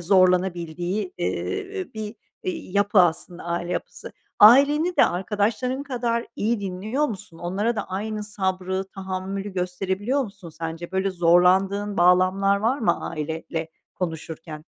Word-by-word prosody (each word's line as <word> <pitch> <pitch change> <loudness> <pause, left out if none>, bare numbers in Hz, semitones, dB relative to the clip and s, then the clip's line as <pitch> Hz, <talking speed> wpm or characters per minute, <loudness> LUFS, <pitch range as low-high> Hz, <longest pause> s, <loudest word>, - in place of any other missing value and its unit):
zorlanabildiği, 180 - +1
ııı, 395 -2 -3
bir, 215 0 -5 0.3
iii, 185 0 -5
yapı 205 0 +3
aslında 175 0 0
aile 175 +1 -2
yapısı. - - -5 0.3
Aileni 290 +10 +7
de - - +7
arkadaşların 210 +8 -1
kadar 240 -4 -1
iyi 220 0 0
dinliyor 205 +9 -2
musun? 195 - -8
Onlara 200 +7 -1
da - - -2
aynı 210 +2 -3
sabrı, 190 -2 -2
tahammülü 195 +1 -4
gösterebiliyor 190 +8 -1
musun 200 -6 -9
sence? 165 +1 -6
Böyle, 190 +1 +1
zorlandığın 185 +4 +3
bağlamlar 185 +3 +4
var 230 +7 +1
mı, 175 -9 0
aileyle 160 +1 -4 0.3
konuşurken? 160 -2 -5
190 Hz, 120 wpm, -24 LUFS, 175-215 Hz, 0.3 s, Aileni